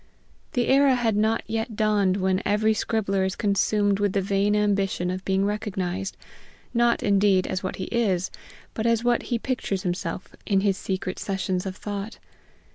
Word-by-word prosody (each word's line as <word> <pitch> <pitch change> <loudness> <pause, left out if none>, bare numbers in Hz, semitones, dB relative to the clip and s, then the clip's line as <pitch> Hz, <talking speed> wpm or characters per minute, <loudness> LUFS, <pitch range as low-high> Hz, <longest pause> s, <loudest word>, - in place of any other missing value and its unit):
The 245 -1 +1
era 275 0 +5
had 230 -3 +1
not 220 +2 +1
yet 225 +1 -3
dawned 205 -3 +2
when 190 -1 +1
every 215 +2 +2
scribbler 205 -3 0
is 190 0 -1
consumed 205 0 +1
with 205 -2 +1
the 200 - +2
vain 200 +1 +1
ambition 195 -3 +1
of 185 +1 -4
being 190 +1 +1
recognized, 195 -2 -3 0.6
not, 235 0 +2
indeed, 200 -2 +3
as 185 0 -2
what 185 - -3
he 185 - -5
is, 195 -5 0 0.4
but 220 +1 -1
as 230 0 +2
what 240 -1 +2
he 240 - +1
pictures 230 -6 -2
himself 175 0 -4
in 195 -2 +2
his 200 -1 +2
secret 190 -1 -4
sessions 190 -1 -2
of 185 - -5
thought. 205 +2 -5
200 Hz, 170 wpm, -25 LUFS, 190-220 Hz, 0.6 s, era